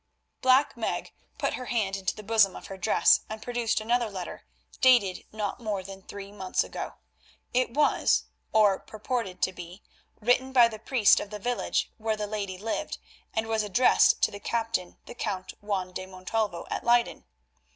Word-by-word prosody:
Black 260 +3 +4
Meg 230 -2 -3 0.3
put - - -1
her 255 - -5
hand 205 -5 0
into 195 -1 -2
the 215 - -9
bosom 215 -3 +4
of - - -9
her - - -6
dress 175 - +4
and 220 0 -5
produced 240 -2 0
another 235 +1 +1
letter 185 -3 -7 0.3
dated 240 -8 +4
not 210 0 -3
more 210 -5 -3
than 195 0 -9
three 200 +1 -9
months 190 -3 -1
ago. - - -6 0.6
It 250 -1 +1
was, 300 0 +3 0.3
or 210 -3 +4
purported 215 -4 -4
to 185 - +2
be, 180 +2 -10 0.4
written 250 +4 +2
by 240 -3 +7
the 215 -1 -8
priest 225 -2 +4
of 205 - -6
the 210 - -6
village 245 +4 -1
where 220 0 -1
the 210 - -2
lady 200 -3 -4
lived, 220 +4 -3 0.4
and 220 0 +1
was 225 -1 0
addressed 210 +5 +4
to - - +4
the 205 - -8
Captain 225 -5 -2
the - - -9
Count 195 -6 -4
Juan 190 -3 -2
de 185 +1 -5
Montalvo 185 0 -3
at - - -2
Leyden. 240 0 +2
215 Hz, 175 wpm, -28 LUFS, 195-235 Hz, 0.6 s, by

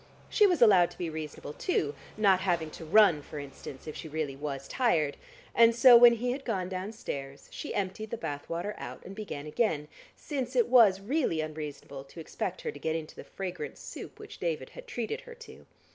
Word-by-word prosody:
She 420 - +5
was 350 -9 +4
allowed 190 -6 +6
to - - -15
be 170 -3 -3
reasonable 155 -2 -6
too 145 -1 -1 0.2
(not 195 -3 +4
having 170 -4 0
to 165 - -9
run, 180 -3 +5
for 150 - -9
instance, 140 -1 -9
if 155 - -6
she - - -7
really 150 -3 -3
was 140 -1 -5
tired) 165 - +1 0.4
and 230 0 +6
so 245 +1 +9
when 235 0 +9
he 245 +2 -1
had 270 +2 -4
gone 190 -7 -2
downstairs, 185 -8 -6
she - - -6
emptied 200 +3 -3
the 235 - -4
bath 145 -10 -5
water 175 +5 -3
out - - -8
and 195 - -8
began 195 -9 -6
again, 150 -2 0 0.3
since 260 -4 -4
it 240 -2 +3
was 220 -7 +6
really 245 - 0
unreasonable 150 -3 -6
to 150 - -13
expect 160 - -4
her 465 - -3
to - - -11
get 160 0 -1
into 160 -1 -5
the - - -9
fragrant 180 -5 -6
soup - - -9
which - - -11
David - - -2
had - - -11
treated 460 0 -3
her 485 -1 -12
to. 470 -1 -14
185 Hz, 205 wpm, -30 LUFS, 155-235 Hz, 0.4 s, so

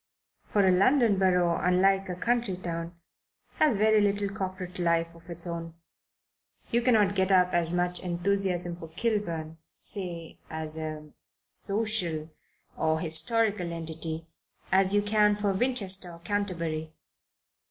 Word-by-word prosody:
For 205 -2 +2
a 185 - +5
London 215 +2 +4
borough, 180 -3 +3
unlike 190 +2 +3
a 180 - -3
country 235 -1 0
town, 170 -1 -5 0.6
has 300 -7 +4
very 215 +1 +4
little 205 0 +1
corporate 185 -3 -5
life 170 -1 +1
of 165 +1 -17
its 170 0 -5
own. 165 -1 -5 1.0
You 235 - +3
cannot 220 -5 +3
get 190 -1 +1
up 180 -1 +4
as 170 -1 +1
much 180 0 +1
enthusiasm 180 -1 -1
for 165 - -9
Kilburn, 165 -5 -2 0.2
say, 175 -5 -2
as 160 -1 -4
a 155 -1 -6 0.3
social 195 -7 -1 0.4
or 160 0 +1
historical 185 +3 +1
entity, 165 -1 -4 0.5
as 190 0 +4
you 205 0 +2
can 210 0 +3
for 205 -1 0
Winchester 195 -5 0
or - - -11
Canterbury. 170 -5 -3
180 Hz, 130 wpm, -28 LUFS, 165-205 Hz, 1.0 s, a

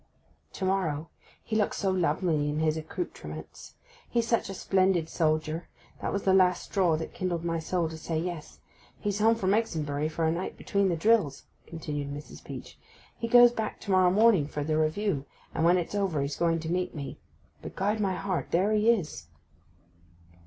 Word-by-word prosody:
'To 190 - -3
morrow. 165 -5 0 0.3
He 220 - -3
looks 210 -2 +1
so 195 - +1
lovely 165 -3 +1
in 150 - -2
his 155 0 +1
accoutrements! 160 - -7 0.3
He's 235 -1 0
such 230 -4 +1
a 195 - -5
splendid 185 -3 +2
soldier; 155 0 0 0.3
that - - -2
was 200 - -2
the 190 - +3
last 185 -1 +4
straw 180 -5 +1
that 160 - -6
kindled 175 -2 -2
my 165 -1 0
soul 170 +1 -1
to 160 0 -8
say 160 0 -3
yes. 170 -2 -5 0.4
He's 205 0 -2
home 225 +2 +5
from 195 -3 +1
Exonbury 155 -9 0
for 160 +1 -1
a 160 - +3
night 175 +3 -4
between 200 -1 +1
the 175 - +1
drills,' 195 -6 +2 0.2
continued 145 -3 -4
Mrs. 145 +1 -9
Peach. - - -9 0.4
'He 230 - -4
goes 245 0 +8
back 220 -2 -4
to 200 - -4
morrow 185 -1 +5
morning 200 -5 +4
for 150 -1 -4
the 155 +1 0
Review, 155 -1 0 0.3
and 160 - -1
when 175 +2 +5
it's 175 +1 -3
over 190 -8 0
he's 140 +1 -3
going 165 -1 +1
to 160 +1 -4
meet 180 0 -1
me. 140 -2 -6 0.4
But, - - -8
guide 205 +3 0
my 195 -3 0
heart, 190 -3 -2
there 190 +5 +2
he 215 +1 +3
is! 165 - 0
175 Hz, 190 wpm, -28 LUFS, 155-200 Hz, 0.4 s, goes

